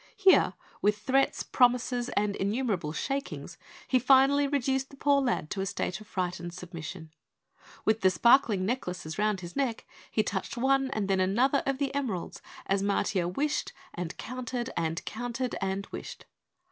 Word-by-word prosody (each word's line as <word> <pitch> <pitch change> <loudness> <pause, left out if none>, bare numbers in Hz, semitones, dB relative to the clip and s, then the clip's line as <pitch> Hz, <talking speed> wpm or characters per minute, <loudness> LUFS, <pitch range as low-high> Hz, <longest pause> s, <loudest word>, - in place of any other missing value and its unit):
Here, 390 -2 +5 0.3
with 210 0 +3
threats, 265 +6 +1
promises 245 0 +2
and 205 -1 +1
innumerable 200 -6 -1
shakings, 275 - -4 0.3
he 255 - +3
finally 270 +3 +5
reduced 270 -1 0
the 275 - -13
poor 280 0 +3
lad 245 - -1
to 195 - -2
a - - -1
state 190 +1 -3
of 215 - -13
frightened 175 -2 -3
submission. 165 -2 -8 0.7
With 220 0 +2
the 190 - +6
sparkling 215 0 +4
necklaces 180 -8 -3
round 210 -3 +1
his 175 -1 -8
neck, 265 -5 -1 0.2
he 215 - +1
touched 200 +3 -3
one 270 +2 +2
and 215 -6 -2
then 195 -1 +2
another 240 +10 +3
of 275 -1 +1
the 275 0 -1
emeralds 245 -11 -3 0.2
as 195 0 +1
Matiah 195 -3 0
wished 295 +9 -1 0.2
and 175 -2 -5
counted 250 0 -4
and 165 0 -2
counted 245 +2 -3
and 195 +1 -1
wished. - - -8
220 Hz, 160 wpm, -29 LUFS, 190-265 Hz, 0.7 s, the